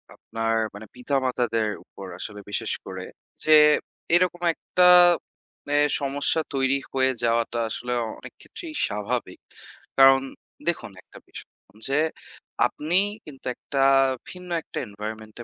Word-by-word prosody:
আপনার 115 0 -2 0.2
মানে 105 +2 -9
পিতা-মাতাদের 125 -4 0 0.2
উপর 100 - -11
আসলে 105 0 -6
বিশেষ - - -2
করে - - -7 0.4
যে 155 0 +6 0.6
এরকম 175 -1 +2
একটা, 180 0 +2 0.8
মানে 145 0 0 0.2
সমস্যা 140 +3 0
তৈরি 135 +1 +2 0.2
হয়ে 130 0 +2
যাওয়াটা 115 0 +1
আসলে 125 +3 -3 0.3
অনেক - - -11
ক্ষেত্রেই 325 -3 -9
স্বাভাবিক। 105 -1 -3 0.6
কারণ 135 0 +7 0.5
দেখুন 170 -10 -1
একটা - - -16
বিষয়, - - -10 0.4
যে 140 +2 +2 0.7
আপনি 165 +5 0 0.3
কিন্তু 140 -3 -12
একটা 135 -1 -1 0.5
ভিন্ন 180 -1 -10
একটা - - -6
environment-এ 110 +2 -8
130 Hz, 115 wpm, -24 LUFS, 115-145 Hz, 0.8 s, কারণ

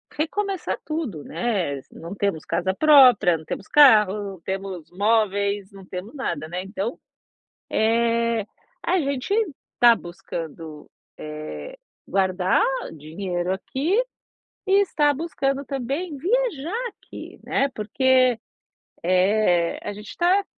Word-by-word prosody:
recomeçar 385 +5 -2
tudo, 290 - -4
né, 175 -6 -2
não 170 +3 -8
temos 200 -6 -1
casa 190 +1 0
própria, 255 - +6
não 155 - -13
temos 195 - -6
carro, 210 -8 +5
temos 190 -3 -5
móveis, 205 0 +1
não 195 -1 -13
temos 185 +6 -7
nada, 170 - -3
né, 180 +2 -3
então, 200 +4 -4 0.7
eh, 230 0 +1 0.4
a 370 - +1
gente 280 +5 -1 0.4
está 240 -1 +6
buscando, 165 -3 -8 0.3
eh, 155 - -7 0.3
guardar 185 -1 +2 0.3
dinheiro 175 +4 -3
aqui, 295 - 0 0.6
e 390 +1 +5
está 295 -6 +2
buscando 280 -3 -2
também 280 +5 -3
viajar 440 - -1
aqui, - - -12
né, 275 - +1
porque, 255 +3 +2 0.6
eh, 180 -1 +2
a - - -4
gente 210 +1 -10
está 370 +3 +2
215 Hz, 110 wpm, -23 LUFS, 185-280 Hz, 0.7 s, própria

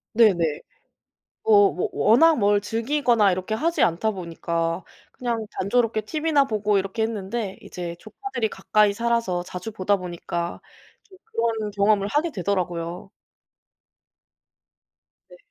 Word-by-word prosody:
네네. 175 -9 +3 0.8
뭐 205 -2 +6
뭐 180 - -2
워낙 310 +9 +5
뭘 205 -1 +3
즐기거나 230 -2 +2
이렇게 185 +4 -2
하지 330 +9 0
않다 180 +6 +2
보니까 170 -1 -3 0.3
그냥 235 -3 -3
단조롭게 225 +2 +1
티비나 300 +5 +1
보고 210 -3 +1
이렇게 195 +4 -2
했는데 215 -1 -3
이제 175 -1 -6
조카들이 230 - -4
가까이 210 -1 +2
살아서 230 -5 0
자주 180 +4 -7
보다 205 -1 +1
보니까 175 -1 -5 0.4
좀 380 -3 -19
그런 230 - -1
경험을 200 0 +2
하게 300 +8 0
되더라구요. 180 -3 -3 2.2
네. - - -15
210 Hz, 275 characters per minute, -24 LUFS, 185-235 Hz, 2.2 s, 뭐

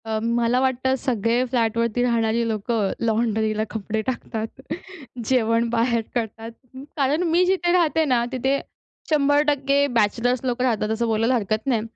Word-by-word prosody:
अ, 220 -1 -1
मला 235 +1 +1
वाटतं 260 0 +1
सगळे 235 -1 0
फ्लॅटवरती 230 -1 0
राहणारी 230 -1 +1
लोकं 215 -1 -1
लॉन्ड्रीला 220 -1 0
कपडे 220 0 -3
टाकतात. 230 -1 -4 0.6
जेवण 230 -1 +2
बाहेर 235 0 +1
करतात. 225 -1 -3 0.5
कारण 290 +4 +1
मी 350 +2 +4
जिथे 360 -1 +1
राहते 320 -3 +2
ना 250 -4 +2
तिथे 265 +2 0 0.5
100% 285 -1 +2
बॅचलर्स 235 +4 +1
लोकं 250 0 -1
राहतात 220 -4 0
असं 230 +1 0
बोलायला 225 +3 +1
हरकत 215 +1 -2
नाही 235 -5 +2
235 Hz, 135 wpm, -23 LUFS, 225-265 Hz, 0.6 s, मी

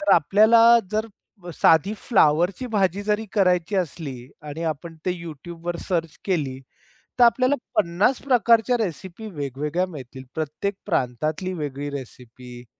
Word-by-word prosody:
तर 300 - +3
आपल्याला 220 +8 +5 0.3
जर, 215 +1 -1 0.5
साधी 165 +6 +4
फ्लॉवरची 180 - +2
भाजी 195 -1 +1
जरी 210 +1 0
करायची 180 -1 +2
असली 140 -8 -4 0.2
आणि 160 +3 -6
आपण 160 +2 -8
ते - - +2
YouTubeवर 170 +2 -6
सर्च 165 -5 -1
केली. 145 -9 -1 0.6
तर 245 - +7
आपल्याला 255 +3 +4 0.2
पन्नास 185 +10 +2
प्रकारच्या 240 -2 +3
रेसिपी 190 +1 -5
वेगवेगळ्या 150 +3 -2
मिळतील, 135 -6 -10
प्रत्येक 160 +6 -3
प्रांतातली 155 - -1
वेगळी 145 -2 -4
रेसिपी. 125 -2 -10
170 Hz, 120 wpm, -23 LUFS, 145-205 Hz, 0.6 s, तर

